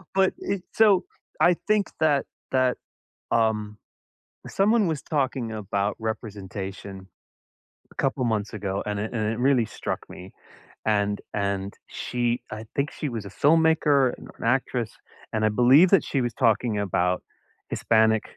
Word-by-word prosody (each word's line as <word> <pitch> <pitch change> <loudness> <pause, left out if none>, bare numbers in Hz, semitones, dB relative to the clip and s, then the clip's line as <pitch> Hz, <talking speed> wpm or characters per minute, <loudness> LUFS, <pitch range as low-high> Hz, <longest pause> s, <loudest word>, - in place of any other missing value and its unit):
But, 190 -1 +3
it, 195 -2 -3
so 205 -4 +5 0.4
I 175 +2 +6
think 210 -2 +3
that 150 -3 +3 0.3
that, 130 -1 +2 0.5
um, 105 -2 +1 0.7
someone 210 +1 +2
was 160 -4 -2
talking 135 -5 -1
about 100 -1 -2
representation 100 -3 -6 0.8
a - - -18
couple 135 -1 0
months 110 -3 -1
ago, 100 -2 -3
and 105 -1 -2
it 110 - -4
and 110 -2 -1
it 115 - -5
really 130 -1 +3
struck - - -4
me. - - -11 0.5
And 105 -1 +1
and 100 -1 -2
she 120 0 -2
I 110 +1 -6
think 140 +1 0
she 150 - -4
was 115 -3 -5
a - - -5
filmmaker, 150 - +3
an - - -12
or - - -14
an - - -8
actress, 125 -2 0 0.4
and 110 -1 0
I - - +5
believe 130 - +6
that 195 -5 +5
she 140 - -1
was 120 -1 -1
talking 115 -3 +2
about 90 -2 0 0.5
Hispanic 110 -1 +3
115 Hz, 150 wpm, -25 LUFS, 105-140 Hz, 0.8 s, I